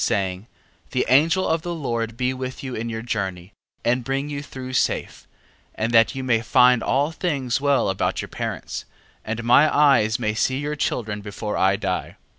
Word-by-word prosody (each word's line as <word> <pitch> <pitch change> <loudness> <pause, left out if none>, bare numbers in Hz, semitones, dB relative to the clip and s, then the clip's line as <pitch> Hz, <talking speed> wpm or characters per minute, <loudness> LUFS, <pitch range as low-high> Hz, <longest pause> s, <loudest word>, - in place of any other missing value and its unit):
Saying: 95 +1 -1 0.4
The - - 0
holy 125 - +5
angel 165 +6 +3
of 160 0 +1
the 175 +1 -4
Lord 115 -6 -3
be 125 +1 0
with 130 0 -6
you 130 -2 -5
in 115 0 -3
your 110 0 -4
journey, 100 -5 -4 0.3
and 120 +1 +2
bring 135 +3 -2
you 140 -1 -3
through 130 -2 -8
safe, - - -1 0.5
and 110 +2 -1
that 115 +2 +5
you 135 - -4
may 115 -3 +2
find 125 +1 +4
all 140 +6 +1
things 140 -7 -1
well 140 -2 +2
about 95 -1 -1
your - - -4
parents, - - -5 0.4
and 115 +2 -4
my 130 +6 +5
eyes 135 -7 +4
may 110 -4 -1
see 130 +4 0
your 145 +2 -3
children 110 -7 -2
before 105 +1 -5
I 95 +1 +3
die. - - -3
125 Hz, 190 wpm, -23 LUFS, 110-140 Hz, 0.5 s, holy